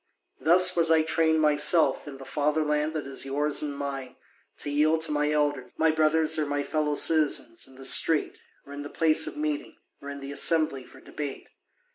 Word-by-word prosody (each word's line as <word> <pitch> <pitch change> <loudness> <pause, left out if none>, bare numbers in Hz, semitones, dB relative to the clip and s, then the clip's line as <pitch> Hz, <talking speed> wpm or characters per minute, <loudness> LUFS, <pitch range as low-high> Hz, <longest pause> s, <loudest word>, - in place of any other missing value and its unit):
Thus 180 +5 +5
was 165 -1 +2
I 160 -1 +3
trained 160 0 +1
myself, 150 +2 +2
in 140 -2 -9
the 135 - -12
fatherland 150 +1 -1
that 155 -2 -5
is 135 0 -4
yours 145 +2 0
and 145 -2 -5
mine, 135 -2 -6 0.4
to 145 - -5
yield 155 +2 +1
to 160 - 0
my 150 0 0
elders, 150 -1 -2
my 160 0 +2
brothers 155 0 +1
or 150 - -1
my 145 0 -2
fellow 150 0 -2
citizens, 150 -8 0
in 130 - -18
the 135 0 -9
street, 155 +3 +2 0.3
or 140 - -12
in 145 - -7
the 145 - -8
place 155 0 +2
of - - -7
meeting, 150 -1 -4 0.3
or 140 - -9
in 140 0 -8
the 140 0 -8
assembly 155 -3 +1
for - - -17
debate. 145 -3 -8
150 Hz, 195 wpm, -26 LUFS, 145-160 Hz, 0.4 s, Thus